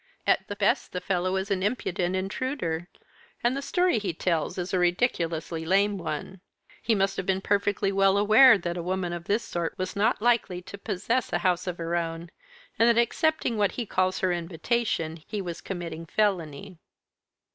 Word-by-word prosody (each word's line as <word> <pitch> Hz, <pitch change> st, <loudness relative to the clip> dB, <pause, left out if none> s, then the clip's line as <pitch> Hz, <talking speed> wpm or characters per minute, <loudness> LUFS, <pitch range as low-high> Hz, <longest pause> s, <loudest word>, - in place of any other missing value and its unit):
At -, -, +2 dB
the -, -, -5 dB
best -, -, +1 dB
the 180 Hz, -, -1 dB
fellow 185 Hz, 0 st, -1 dB
is 190 Hz, +1 st, -2 dB
an 190 Hz, -2 st, +1 dB
impudent 185 Hz, -4 st, -1 dB
intruder, 190 Hz, -, -2 dB, 0.6 s
and 240 Hz, +2 st, +2 dB
the 275 Hz, -, -2 dB
story 355 Hz, -3 st, +1 dB
he 195 Hz, -5 st, -3 dB
tells 170 Hz, +1 st, -1 dB
is 180 Hz, +1 st, -4 dB
a 185 Hz, -, +2 dB
ridiculously 170 Hz, -4 st, 0 dB
lame 200 Hz, +4 st, +2 dB
one. 175 Hz, +3 st, -5 dB, 0.4 s
He 225 Hz, -, +2 dB
must 195 Hz, -1 st, 0 dB
have 190 Hz, -, -3 dB
been 190 Hz, 0 st, +2 dB
perfectly 200 Hz, 0 st, +1 dB
well 195 Hz, 0 st, +3 dB
aware 220 Hz, +4 st, +7 dB
that 175 Hz, -1 st, -4 dB
a -, -, -2 dB
woman 180 Hz, 0 st, -2 dB
of 170 Hz, -1 st, -6 dB
this 210 Hz, +5 st, +1 dB
sort 170 Hz, -5 st, -3 dB
was 185 Hz, +2 st, -3 dB
not 215 Hz, +4 st, +2 dB
likely 230 Hz, -6 st, +1 dB
to 200 Hz, -, -9 dB
possess 205 Hz, +5 st, -1 dB
a -, -, +2 dB
house 180 Hz, 0 st, +1 dB
of 180 Hz, -1 st, -3 dB
her 170 Hz, 0 st, -2 dB
own, 165 Hz, 0 st, -3 dB, 0.5 s
and 230 Hz, +1 st, +6 dB
that 235 Hz, 0 st, +4 dB
accepting 245 Hz, 0 st, +1 dB
what 205 Hz, -1 st, +2 dB
he 240 Hz, -, -3 dB
calls 185 Hz, -2 st, 0 dB
her 185 Hz, -1 st, +2 dB
invitation 170 Hz, -1 st, -2 dB
he 210 Hz, -, -4 dB
was 175 Hz, -4 st, -5 dB
committing 165 Hz, -3 st, -6 dB
felony." 180 Hz, -4 st, -1 dB
190 Hz, 185 wpm, -27 LUFS, 175-210 Hz, 0.6 s, aware